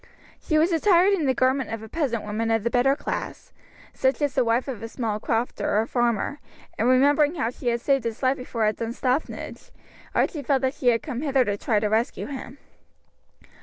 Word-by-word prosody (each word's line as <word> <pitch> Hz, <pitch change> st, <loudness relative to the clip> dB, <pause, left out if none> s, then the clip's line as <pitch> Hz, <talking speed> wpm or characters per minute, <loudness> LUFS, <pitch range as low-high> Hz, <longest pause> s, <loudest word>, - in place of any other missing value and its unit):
She 310 Hz, -, 0 dB
was 325 Hz, +4 st, +3 dB
attired 360 Hz, +3 st, +4 dB
in 325 Hz, -7 st, 0 dB
the 260 Hz, -, +3 dB
garment 260 Hz, 0 st, +1 dB
of 225 Hz, -1 st, -5 dB
a -, -, -8 dB
peasant 245 Hz, -4 st, -2 dB
woman 215 Hz, +2 st, -2 dB
of 225 Hz, -2 st, +1 dB
the 235 Hz, -, 0 dB
better 265 Hz, +2 st, +3 dB
class, -, -, -5 dB, 0.4 s
such 265 Hz, +1 st, +1 dB
as 285 Hz, -2 st, 0 dB
the 260 Hz, -, +2 dB
wife 235 Hz, +3 st, +1 dB
of 250 Hz, -6 st, -5 dB
a 225 Hz, -, -5 dB
small 225 Hz, -2 st, -3 dB
crofter 225 Hz, -2 st, -1 dB
or 220 Hz, -, +1 dB
farmer, 240 Hz, +3 st, 0 dB, 0.4 s
and 230 Hz, +3 st, +1 dB
remembering 290 Hz, +4 st, +4 dB
how 235 Hz, -7 st, -1 dB
she 250 Hz, -, -8 dB
had 235 Hz, 0 st, +1 dB
saved 275 Hz, -2 st, +1 dB
his 230 Hz, +3 st, -4 dB
life 260 Hz, +1 st, +2 dB
before 245 Hz, -3 st, -3 dB
at 215 Hz, 0 st, 0 dB
Dunstaffnage, 250 Hz, +5 st, -3 dB, 0.5 s
Archie 300 Hz, -, +1 dB
felt 275 Hz, -1 st, 0 dB
that 260 Hz, 0 st, +1 dB
she 255 Hz, -, -4 dB
had 230 Hz, -2 st, +3 dB
come 255 Hz, -4 st, -4 dB
hither 275 Hz, -4 st, +2 dB
to 205 Hz, -2 st, -1 dB
try 210 Hz, +1 st, 0 dB
to 215 Hz, -, -2 dB
rescue 220 Hz, +3 st, 0 dB
him. 265 Hz, -1 st, -8 dB
250 Hz, 205 wpm, -24 LUFS, 230-280 Hz, 0.5 s, attired